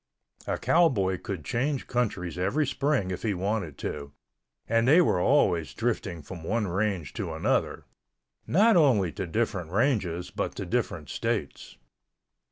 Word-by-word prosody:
A - - -1
cowboy 100 - +2
could 95 - -6
change 135 - -1
countries 100 -8 -2
every 100 +13 +1
spring 135 -8 0
if 90 - -4
he 105 -4 -1
wanted 95 -4 -2
to 70 0 -5 0.6
and 115 +1 +2
they 155 +6 +7
were 165 - +3
always 90 - +2
drifting 105 -8 -2
from 85 +3 -9
one 110 +5 0
range 95 -2 -1
to 95 -7 -4
another—not 165 - 0
only 120 - +4
to 90 - -5
different 95 -3 -1
ranges 95 -5 0
but - - -3
to - - -4
different - - -2
states. - - -3
100 Hz, 140 wpm, -27 LUFS, 90-125 Hz, 0.6 s, they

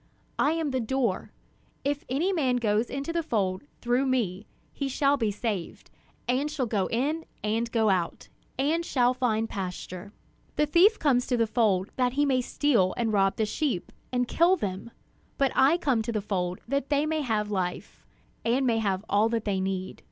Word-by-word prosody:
I 295 - +3
am 325 -3 -1
the 260 - 0
door; 235 -4 -1 0.5
if 290 +4 -1
any 325 +10 +1
man 265 -8 +1
goes 225 -1 +1
into 280 +4 -4
the 340 - +1
fold 205 - -1 0.2
through 245 +3 +1
me, 215 -6 -1 0.3
he 280 - -2
shall 280 +2 +2
be 230 -6 0
saved, 205 -3 -4 0.4
and 260 +4 +1
shall 295 -4 -1
go 205 -5 0
in 295 +8 -1 0.2
and 225 +2 -1
go 220 -3 +3
out, 180 -3 -1 0.3
and 305 +6 +1
shall 250 -6 +2
find 225 -3 0
pasture. 185 -1 -6 0.4
"The 300 - +3
thief 360 +9 +5
comes 255 -5 +2
to 250 - +1
the 230 - +3
fold 210 -5 +1
that 250 -1 +2
he 290 +2 +2
may 260 -2 +2
steal 240 -8 +1
and 225 -2 0
rob 195 -1 +3
the 220 - +1
sheep, 230 - -2 0.2
and 245 -1 0
kill 345 +7 +4
them; 195 - -4 0.5
but 275 -1 +2
I 280 +6 +5
came 270 -9 +1
to 220 - -3
the 215 - 0
fold 185 -3 -2
that 275 +2 -1
they 290 0 +2
may 310 0 0
have 215 -5 -1
life, 180 -3 -3 0.4
and 250 +4 +2
may 230 -2 +2
have 200 -2 -1
all 210 +2 +3
that 230 -1 -1
they 200 -2 0
need. 190 0 -3
240 Hz, 190 wpm, -27 LUFS, 210-280 Hz, 0.5 s, thief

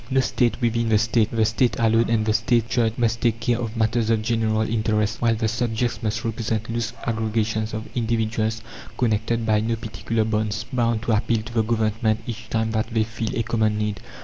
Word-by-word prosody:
"No 135 - +2
state 125 -2 +1
within 115 -1 +1
the 110 - +5
State!" 110 0 +2
The 110 -1 +2
State 110 +1 +1
alone, 115 0 +3
and 110 -2 +2
the 110 - +2
State's 115 0 +1
Church, 115 -3 +2
must 115 -1 0
take 115 -2 +1
care 120 +1 0
of 115 -1 -4
matters 110 0 +1
of 110 -1 +2
general 110 -1 +1
interest, 110 0 0
while 115 -1 +3
the 110 0 0
subjects 120 +1 -1
must 110 0 -2
represent 115 0 -2
loose 115 -1 -2
aggregations 110 -1 -1
of 110 0 -5
individuals, 110 -1 -1 0.3
connected 115 0 0
by 110 -1 +3
no 115 +2 0
particular 110 0 -2
bonds, 110 0 -1
bound 115 -2 +1
to 115 - 0
appeal 110 0 +1
to 115 +1 -9
the 115 - +3
Government 110 0 0
each 115 -1 -7
time 110 0 0
that 110 +1 -1
they 110 -1 +2
feel 115 0 -4
a 115 - +1
common 110 -2 +1
need. 105 -2 -2
110 Hz, 200 wpm, -23 LUFS, 110-115 Hz, 0.3 s, the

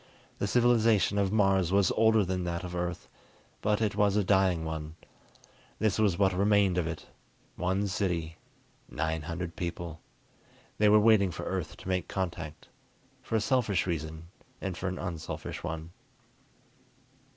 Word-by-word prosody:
The 100 - 0
civilization 115 -4 +3
of 95 -1 +1
Mars 95 -4 +3
was 100 -1 +3
older 110 -2 +4
than 90 0 -2
that 85 +1 -3
of 90 -1 -6
Earth, 90 0 -3 0.5
but 105 +1 +1
it 105 -2 0
was 105 -1 +3
a 105 - +3
dying 95 -4 +2
one. 80 0 -5 0.8
This 110 -2 +1
was 100 -5 +3
what 95 -1 +3
remained 100 -1 +3
of 85 - -1
it: 85 0 -5 0.5
one 95 +3 0
city, 90 -4 -2 0.5
nine 80 +2 -2
hundred 85 +2 -5
people. 85 -2 -5 0.8
They 105 0 +5
were 105 +1 +7
waiting 105 -3 +5
for 85 - -6
Earth - - -4
to - - -11
make 90 -2 -1
contact, 85 -5 -4 0.5
for - - -3
a - - +4
selfish 110 -6 +1
reason 80 -1 -4 0.3
and 95 -2 -4
for 90 - -4
an 90 0 -3
unselfish 85 -3 -5
one. 80 +1 -5
95 Hz, 150 wpm, -29 LUFS, 85-100 Hz, 0.8 s, were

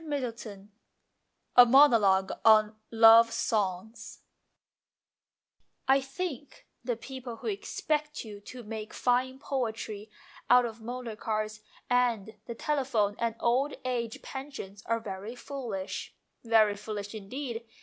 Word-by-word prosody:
XXXI 230 -8 -5 0.9
A 245 - +12
MONOLOGUE 230 -8 +4
ON 215 -1 +5
LOVE 230 0 +7
SONGS 215 -2 -3 0.8
" - - -50
I 275 - +2
THINK 280 0 -6 0.2
the 245 -1 -1
people 255 0 -8
who - - -13
expect 300 - -2
you 210 -2 -9
to 245 +4 -10
make 215 0 -7
fine 255 +1 +1
poetry 220 -6 -4 0.4
out 245 0 +6
of 225 -1 -7
motor 240 -1 -6
cars 215 -1 -3 0.3
and 235 -4 +1
the 235 - -5
tele 295 +3 -1
phone 210 -5 +1
and 230 -1 -1
old 260 +5 +1
age 235 -3 -3
pensions 265 -8 -8
are 230 0 +1
very 205 +2 -7
foolish, 240 -8 -6 0.3
very 220 -3 +4
foolish 205 0 -6
indeed. 230 +3 -6
230 Hz, 120 wpm, -29 LUFS, 215-255 Hz, 0.9 s, A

